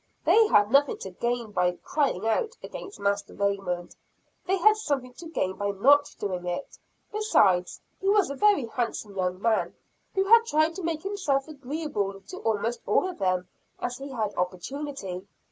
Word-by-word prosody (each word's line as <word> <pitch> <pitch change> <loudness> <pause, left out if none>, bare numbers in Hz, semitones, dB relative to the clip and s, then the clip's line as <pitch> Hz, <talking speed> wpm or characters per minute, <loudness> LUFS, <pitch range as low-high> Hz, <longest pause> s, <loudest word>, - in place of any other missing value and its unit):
They 445 -1 +6
had 205 - +4
nothing 280 +1 +4
to 190 - -7
gain 235 +3 -2
by 180 -2 +1
"crying 270 -10 0
out" 455 - 0
against 400 - -8
Master 200 0 -1
Raymond, 195 -3 -2 0.5
they 385 +1 +2
had 430 +4 +6
something 280 - -2
to 330 +6 -10
gain 190 - -2
by 205 0 -1
not 280 +9 +4
doing 180 -3 -3
it; 175 +10 -5 0.3
besides, 200 - +2 0.2
he 390 - 0
was 400 -7 +3
a - - -4
very 410 - +4
handsome 230 -3 -3
young 185 -1 -1
man, 225 +1 +1 0.4
who 385 - +3
had 460 +3 +6
tried 310 -1 +2
to 380 - -5
make 320 -2 -2
himself 355 -9 0
agreeable 275 -9 -3
to 365 - -10
almost 225 - -1
all 375 - +3
of 370 - -7
them 185 -2 0 0.3
as 245 0 -3
he 275 +1 -7
had 220 -6 -2
opportunity. 190 +1 -4
245 Hz, 170 wpm, -27 LUFS, 195-320 Hz, 0.5 s, They